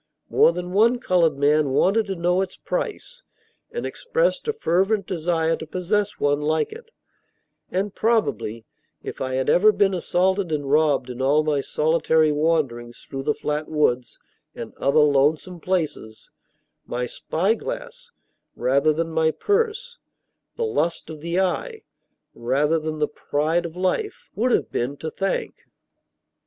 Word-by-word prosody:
More - - +5
than 180 +1 -5
one 225 +6 +4
colored 175 - +2
man 145 +1 +3
wanted 200 +10 +2
to 195 - -3
know 175 +2 +1
its 190 -1 -4
price, - - -4 0.5
and 475 - -5
expressed - - -1
a 445 - +1
fervent 195 - +1
desire 165 -2 0
to 160 - -8
possess 200 +5 -1
one 145 0 +1
like 155 +1 0
it; 460 +1 -11 0.8
and 195 +2 -2
probably, 140 - 0 0.4
if - - -7
I 130 0 -2
had 130 0 -1
ever 215 +5 +5
been 200 -1 +2
assaulted 185 +1 0
and 145 -2 -2
robbed 145 -4 +2
in 125 +1 -6
all 145 +3 +3
my 150 -2 +1
solitary 160 +1 +2
wanderings 145 -7 -1
through 135 - -5
the 150 +2 0
flat 150 +1 -3
woods 125 -6 0 0.4
and - - -7
other 140 +2 +3
lonesome 150 +5 +2
places, 155 -11 -3 0.6
my 125 0 -2
"spyglass" 230 - -3 0.5
rather 140 +5 +2
than 165 +2 -2
my 160 0 +2
purse 460 - -1 0.6
the 470 - 0
"lust 170 - -1
of 155 -2 -9
the 170 +3 -1
eye" 435 - -1 0.5
rather 140 +7 +1
than 155 0 -4
the 150 0 +1
"pride 160 +4 -1
of 165 - -12
life" 185 - -2
would 245 +4 0
have - - +1
been 130 +4 -2
to 160 +2 -5
thank. 195 0 -3
165 Hz, 145 wpm, -23 LUFS, 150-195 Hz, 0.8 s, More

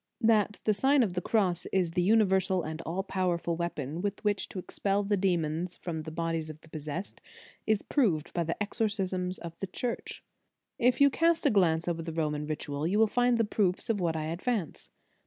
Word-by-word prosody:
That 215 -2 +3
the 215 - +3
Sign 270 +5 +4
of 195 -6 -1
the 180 - -1
Cross 185 -4 +1
is 180 -3 +1
the 180 +2 +1
univer 195 -4 +4
sal 185 -1 0
and 155 +1 -5
all 180 +4 -1
powerful 180 -3 -1
weapon 165 -2 -3
with 205 +1 -3
which 205 -2 0
to - - -9
expel 195 +2 -1
the 205 +1 +1
demons 175 -2 0
from 165 -3 -4
the 160 +1 -7
bodies 165 -1 -2
of 155 0 -10
the 160 - -18
pos 155 -2 -7
sessed, 170 +6 -5 0.5
is 215 -2 +2
proved 190 - +1
by 170 - 0
the 165 - -2
exorcisms 195 -4 -1
of 170 -1 -8
the 195 - -3
Church. 235 +6 -4 0.6
If 250 +3 +3
you 280 0 +7
cast 330 +2 +2
a 285 - +5
glance 170 -5 +3
over 170 -1 -1
the 165 0 -5
Roman 150 -2 -1
Ritual, 150 0 -3
you 195 +4 +1
will 220 - +6
find 245 +2 +2
the 230 - +2
proof 200 -2 0
of 210 - -1
what 170 -3 0
I 155 -1 -2
ad 165 +3 -4
vance. 225 -10 -2
185 Hz, 210 wpm, -29 LUFS, 165-210 Hz, 0.6 s, you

